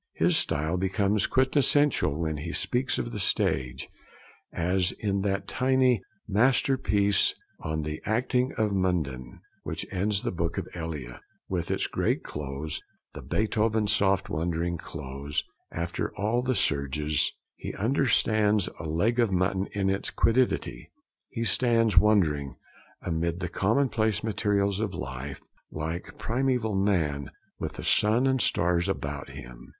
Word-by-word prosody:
His - - +3
style 80 +5 +1
becomes 95 +2 +1
quintessential 130 - +2
when 80 -2 -1
he 85 +4 -5
speaks 130 +2 0
of 120 - -3
the 105 - -4
stage, 65 -8 0 0.6
as 90 +1 +1
in 100 -2 -1
that 100 0 -1
tiny 130 -3 +2 0.3
masterpiece, 105 -3 +3 0.2
On 80 0 -3
the 75 +1 -4
Acting 125 +3 +1
of 105 -2 0
Munden, 75 -10 -1 0.2
which - - -4
ends 100 +2 0
the - - -1
book 85 -1 -2
of - - -3
Elia, 75 -8 -6 0.3
with 85 -3 -2
its - - 0
great - - 0
close, 75 +1 -4 0.3
the - - -8
Beethoven 110 0 +1
soft 100 -1 +2
wondering 85 -1 -1
close, 70 -2 -4 0.3
after 85 +1 -3
all 110 +5 +1
the 130 0 0
surges: 75 0 +1 0.3
'He - - -6
understands 110 -3 +2
a 80 - -6
leg 105 +10 +1
of 115 -4 +3
mutton 95 +1 +1
in 100 -2 -1
its 95 - -1
quiddity. 115 - +1 0.4
He 115 - -3
stands 115 -3 +2
wondering, 80 - +3 0.5
amid 85 0 -1
the 85 - -3
commonplace 110 - +1
materials 100 -2 +1
of 105 -3 -2
life, 65 +2 -6 0.3
like 80 +3 -5
primeval 125 -2 0
man 85 -8 0 0.3
with - - -4
the - - -8
sun 110 +5 +3
and 130 -1 +2
stars 90 0 +2
about 70 -6 -3
him.' 60 -3 -11
95 Hz, 135 wpm, -27 LUFS, 80-110 Hz, 0.6 s, His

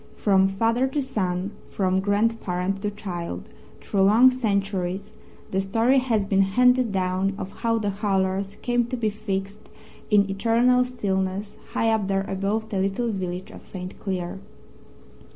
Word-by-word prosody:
From 195 -2 +3
father 230 +6 +1
to 265 +3 -2
son, 190 -7 -2 0.2
from 190 -1 +1
grandparent 195 -2 0
to 210 - -1
child, 175 - -6 0.3
through 195 - 0
long 225 +7 +7
centuries, 200 -4 -1 0.4
the 190 - +1
story 230 +7 +3
has 230 -6 +1
been 195 -1 +3
handed 250 +4 +3
down 190 +1 0
of 190 - -6
how 230 -1 +2
"The 205 -2 -1
Hurlers" 195 -1 -1
came 240 -1 +2
to 255 - -3
be 220 -3 0
fixed 200 0 -5 0.4
in 205 -2 +4
eternal 235 +5 +3
stillness 200 -4 -2
high 225 0 +2
up 215 -3 +1
there 195 0 0
above 205 +3 -2
the 195 - 0
little 195 +5 0
village 185 -2 -4
of - - -12
St. 185 -1 -8
Cleer. 185 -2 -3
200 Hz, 150 wpm, -24 LUFS, 190-225 Hz, 0.4 s, long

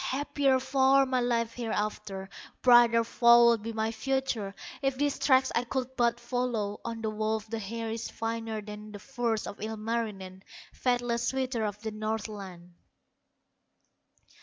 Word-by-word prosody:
Happier 275 -1 +1
far 270 +1 +4
my 260 -1 0
life 230 -2 0
hereafter, 210 -4 -3 0.4
Brighter 240 -2 +6
far 235 +1 +6
would 235 -2 +4
be 225 +2 -4
my 220 0 -1
future, 230 -4 -2 0.3
If 270 -1 0
these 290 0 0
tracks 260 -1 +4
I 235 - +1
could 260 +1 -3
but 235 -1 +2
follow; 240 -4 -2
On 230 -1 -5
the 220 - -1
wolf 215 0 -1
the 225 +1 -4
hair 225 +2 -4
is 225 0 -4
finer 225 -1 -4
Than 210 0 -9
the - - -6
furs 235 -2 -2
of 200 - -8
Ilmarinen, 215 -4 -4 0.3
Faithless 245 -1 0
suitor 260 -3 -1
of 205 -1 -4
the 220 - -3
Northland." 210 -5 -5
230 Hz, 145 wpm, -29 LUFS, 215-250 Hz, 0.4 s, Brighter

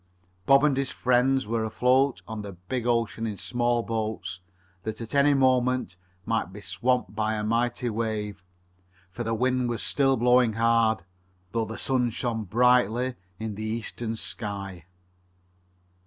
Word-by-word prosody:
Bob 135 +1 +6
and 145 -3 +3
his 135 -1 0
friends 130 +1 +2
were 115 +1 -1
afloat 125 +4 +2
on 110 -1 -5
the 100 -1 -7
big 110 +8 -4
ocean 115 -1 0
in 105 -2 -4
small 120 +1 0
boats 110 -5 -3 0.4
that, 110 +3 -5
at 115 -1 -7
any 140 0 +5
moment, 130 -5 +2 0.3
might 115 -5 -1
be 100 - -9
swamped 125 +2 -1
by 110 0 0
a 105 - -2
mighty 120 +2 0
wave, 105 -3 -3 0.7
for 120 - -5
the 115 0 -1
wind 125 +1 +1
was 115 -2 -2
still 135 -2 +2
blowing 125 -1 +4
hard, 115 -3 +2 0.5
though 115 0 0
the 110 +1 -7
sun 125 -2 +1
shone 115 -1 -3
brightly 125 +3 +3 0.2
in 110 -1 -4
the 105 +2 -6
eastern 115 +1 -3
sky. 100 -6 -5
115 Hz, 150 wpm, -26 LUFS, 110-125 Hz, 0.7 s, Bob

